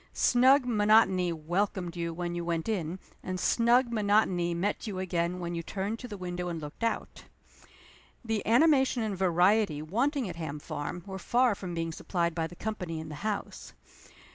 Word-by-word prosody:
Snug 260 Hz, +2 st, +5 dB
monotony 210 Hz, -5 st, +4 dB
welcomed 175 Hz, +2 st, -2 dB
you 170 Hz, -1 st, -2 dB
when 175 Hz, +1 st, -4 dB
you 175 Hz, 0 st, -3 dB
went 170 Hz, -1 st, -2 dB
in, 185 Hz, -5 st, -2 dB, 0.2 s
and 185 Hz, 0 st, -4 dB
snug 235 Hz, +4 st, +3 dB
monotony 205 Hz, -5 st, +2 dB
met 205 Hz, +6 st, -2 dB
you 200 Hz, -3 st, -4 dB
again 175 Hz, -1 st, -1 dB
when 175 Hz, -1 st, -4 dB
you 170 Hz, -, -2 dB
turned 200 Hz, +6 st, -4 dB
to 250 Hz, -, -7 dB
the 210 Hz, -4 st, -7 dB
window 180 Hz, -1 st, -4 dB
and 170 Hz, -1 st, -4 dB
looked 150 Hz, +8 st, -8 dB
out. 230 Hz, -, -2 dB, 1.0 s
The 225 Hz, -2 st, -1 dB
animation 265 Hz, 0 st, +4 dB
and 210 Hz, -2 st, -2 dB
variety 185 Hz, -1 st, +3 dB
wanting 245 Hz, -, 0 dB
at 175 Hz, -2 st, -7 dB
Ham 155 Hz, -3 st, -4 dB
Farm 150 Hz, +3 st, -5 dB
were 190 Hz, -1 st, -6 dB
far 245 Hz, +4 st, +2 dB
from 185 Hz, -3 st, -6 dB
being 165 Hz, 0 st, -2 dB
supplied 170 Hz, 0 st, -1 dB
by 165 Hz, -1 st, -1 dB
the 175 Hz, -, -13 dB
company 180 Hz, -6 st, -4 dB
in 160 Hz, 0 st, -7 dB
the -, -, -7 dB
house. 210 Hz, -1 st, -4 dB
185 Hz, 175 wpm, -29 LUFS, 170-220 Hz, 1.0 s, Snug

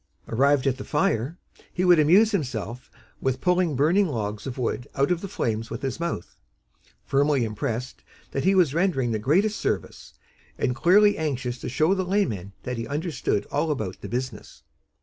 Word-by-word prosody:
Arrived 140 Hz, +3 st, +2 dB
at 135 Hz, -2 st, +1 dB
the -, -, -5 dB
fire, 145 Hz, +1 st, 0 dB, 0.3 s
he 180 Hz, -, -1 dB
would 175 Hz, -2 st, +6 dB
amuse 190 Hz, +9 st, +5 dB
himself 125 Hz, -, -3 dB, 0.3 s
with 130 Hz, -1 st, 0 dB
pulling 180 Hz, -4 st, +2 dB
burning 170 Hz, +9 st, +3 dB
logs 105 Hz, -5 st, -4 dB
of 130 Hz, -, -5 dB
wood 125 Hz, -1 st, -2 dB
out 140 Hz, +5 st, +2 dB
of 175 Hz, -1 st, 0 dB
the 195 Hz, -, -5 dB
flames 115 Hz, -, -2 dB
with -, -, -6 dB
his 135 Hz, +2 st, -3 dB
mouth, 170 Hz, -, -4 dB, 0.7 s
firmly 140 Hz, -1 st, +2 dB
impressed 115 Hz, +3 st, -4 dB, 0.3 s
that 135 Hz, -, -2 dB
he 195 Hz, +1 st, +3 dB
was 170 Hz, -7 st, +4 dB
rendering 155 Hz, -8 st, +1 dB
the 110 Hz, -, -1 dB
greatest 190 Hz, -, +2 dB
service, -, -, -3 dB, 0.4 s
and 125 Hz, -, 0 dB
clearly 205 Hz, +7 st, +4 dB
anxious 130 Hz, -5 st, -2 dB
to -, -, -5 dB
show 155 Hz, +8 st, +2 dB
the 190 Hz, -1 st, 0 dB
laymen 175 Hz, -, -1 dB
that 125 Hz, -1 st, -4 dB
he 115 Hz, -, -4 dB
understood 150 Hz, -, -1 dB
all 145 Hz, +3 st, 0 dB
about 110 Hz, -11 st, -3 dB
the -, -, -7 dB
business. 120 Hz, -, -5 dB
140 Hz, 175 wpm, -25 LUFS, 120-175 Hz, 0.7 s, would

